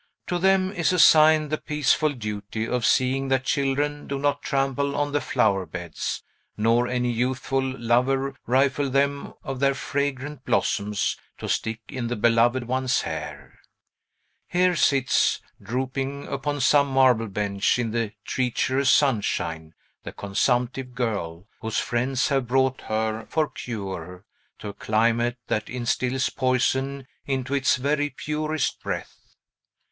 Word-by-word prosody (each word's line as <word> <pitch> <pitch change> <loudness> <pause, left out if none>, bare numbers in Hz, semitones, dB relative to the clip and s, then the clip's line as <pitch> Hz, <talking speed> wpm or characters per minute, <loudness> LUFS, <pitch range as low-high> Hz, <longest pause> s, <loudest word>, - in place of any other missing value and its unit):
To 175 - -1
them 190 0 +3
is 175 -4 +1
assigned 155 -3 +6
the 155 - 0
peaceful 150 +1 +1
duty 105 -2 -4
of 125 -1 0
seeing 130 +1 +2
that 135 -1 +1
children 145 +2 -1
do 140 - -2
not 145 +1 0
trample 140 +1 0
on 145 0 0
the 145 0 0
flower 100 -5 +1
beds, 85 0 -5 0.3
nor 115 +3 +3
any 125 -1 0
youthful 130 +3 -1
lover 130 +1 0
rifle 135 +3 +2
them 140 +1 0
of 135 -1 -5
their 140 0 +2
fragrant 140 0 -3
blossoms 105 -4 0 0.2
to - - -6
stick 110 +1 -2
in 125 0 -4
the 120 - -2
beloved 120 +3 +3
one's 130 0 +1
hair. - - -7 0.9
Here 180 0 +2
sits 135 -5 +2 0.2
(drooping 135 +5 -3
upon 145 +1 -2
some 140 +2 +4
marble 130 -4 +3
bench, 100 +1 0
in 120 -3 -1
the 115 -2 -2
treacherous 130 +2 0
sunshine) 80 - +1 0.3
the - - -7
consumptive 125 +5 -1
girl, 100 -8 -3
whose 110 0 -3
friends 130 +3 0
have 135 -3 0
brought 130 +1 +1
her, 110 0 -2
for 155 -1 +1
cure, 95 -5 -6 0.3
to 105 - -7
a - - -7
climate 115 +3 +1
that 110 0 -2
instils 125 +1 -1
poison 130 +1 0 0.2
into 135 -1 -2
its 140 -1 +3
very 145 +3 0
purest 150 +2 -2
breath. - - -6
130 Hz, 135 wpm, -25 LUFS, 115-140 Hz, 0.9 s, assigned